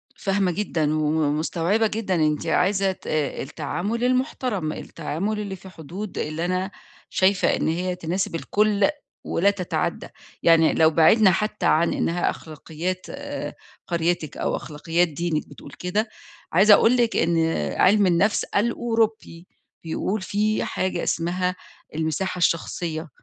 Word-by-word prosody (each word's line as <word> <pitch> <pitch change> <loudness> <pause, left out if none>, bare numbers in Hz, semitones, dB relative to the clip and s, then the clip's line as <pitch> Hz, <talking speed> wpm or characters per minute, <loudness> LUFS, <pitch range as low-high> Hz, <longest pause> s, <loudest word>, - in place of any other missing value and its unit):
فاهمة 195 -2 0
جدًا 160 -5 -1
وم 150 -1 +1
مستوعبة 180 +7 +1
جدًا 210 -4 -2
أنتِ 155 -2 +1
عايزة 195 +1 +2
ت 185 - -12
التعامل 160 - -2
المحترم، 250 - 0
التعامل 170 +8 -4
اللي 200 -2 -4
في 190 +1 -13
حدود 185 +4 -8
اللي 155 +3 -2
أنا 185 +2 -1 0.4
شايفة 190 0 +2
إن - - -1
هي 180 +3 -1
تناسب 180 +1 -2
الكل 205 +3 +2 0.3
ولا 195 +4 +2
تتعدى، 185 -3 -3 0.4
يعني 165 -1 +5
لو 160 -1 +5
بعدنا 185 +6 +5
حتى 210 +2 -1
عن 165 +2 +3
إنها 175 +1 0
أخلاقيات 165 +4 -5
آآ 285 0 -6 0.3
قريتِك 170 -3 -1
أو - - -1
أخلاقيات 165 +3 -1
دينِك 160 0 -2
بتقول - - -12
كده، 210 +5 -1 0.4
عايزة 200 +5 +7
أقول 230 +4 +5
لِك 235 -1 +2
إن 165 0 +2 0.4
عِلم 205 +1 +5
النَفْس 185 +4 +2
الأوروبي 225 -5 -1 0.4
بيقول 185 +5 -2
فيه 210 +3 0
حاجة 185 -2 -2
اسمها 180 +2 -1 0.4
المساحة 160 +4 -2
الشخصية، 165 -1 -1
180 Hz, 130 wpm, -24 LUFS, 165-205 Hz, 0.4 s, عايزة